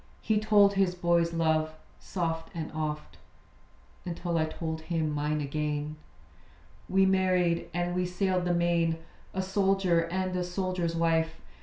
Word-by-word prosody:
He 215 Hz, -1 st, +2 dB
told 205 Hz, -2 st, +5 dB
his 195 Hz, -2 st, +2 dB
boy's 170 Hz, -1 st, +2 dB
love, 160 Hz, -1 st, +1 dB, 0.2 s
soft 165 Hz, -3 st, -3 dB
and 160 Hz, -2 st, -4 dB
oft, 155 Hz, -1 st, -4 dB, 0.8 s
Until 175 Hz, 0 st, -3 dB
I 155 Hz, -, +2 dB
told 160 Hz, 0 st, -4 dB
him 160 Hz, -2 st, -1 dB
mine 150 Hz, +1 st, -1 dB
again. 150 Hz, +1 st, -2 dB, 0.9 s
We 190 Hz, +1 st, +4 dB
married, 185 Hz, -3 st, +2 dB
and 175 Hz, 0 st, -1 dB
we 180 Hz, 0 st, 0 dB
sailed 180 Hz, 0 st, 0 dB
the 175 Hz, -, +2 dB
main; 170 Hz, -1 st, +2 dB, 0.4 s
A 190 Hz, -, 0 dB
soldier, 190 Hz, -3 st, +2 dB
and 185 Hz, +1 st, -1 dB
a 180 Hz, -, 0 dB
soldier's 180 Hz, -2 st, -2 dB
wife. 165 Hz, -1 st, +1 dB
170 Hz, 140 wpm, -29 LUFS, 160-185 Hz, 0.9 s, told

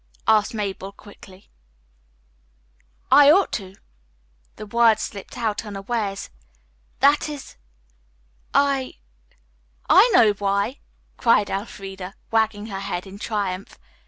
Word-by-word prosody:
asked 220 Hz, +1 st, +3 dB
Mabel 195 Hz, -2 st, -4 dB
quickly. 195 Hz, -2 st, -16 dB, 1.6 s
"I 290 Hz, -1 st, +8 dB
ought 380 Hz, +6 st, +4 dB
to." 190 Hz, -3 st, -5 dB, 0.8 s
The 215 Hz, -, -8 dB
words 225 Hz, 0 st, +3 dB
slipped 200 Hz, +4 st, -8 dB
out 220 Hz, -3 st, -2 dB
unawares. 200 Hz, -1 st, -4 dB, 0.7 s
"That 285 Hz, +2 st, +4 dB
is 290 Hz, -2 st, -9 dB, 1.0 s
I 275 Hz, -2 st, +1 dB, 0.4 s
" -, -, -40 dB, 0.3 s
"I 390 Hz, +8 st, +7 dB
know 220 Hz, -3 st, +6 dB
why!" 200 Hz, +6 st, -1 dB, 0.4 s
cried 215 Hz, -4 st, +3 dB
Elfreda, 195 Hz, -1 st, -6 dB, 0.2 s
wagging 220 Hz, -2 st, +1 dB
her 195 Hz, -3 st, -6 dB
head 195 Hz, -2 st, -4 dB
in 195 Hz, +1 st, -11 dB
triumph. 200 Hz, -4 st, -4 dB
205 Hz, 105 wpm, -23 LUFS, 195-235 Hz, 1.6 s, I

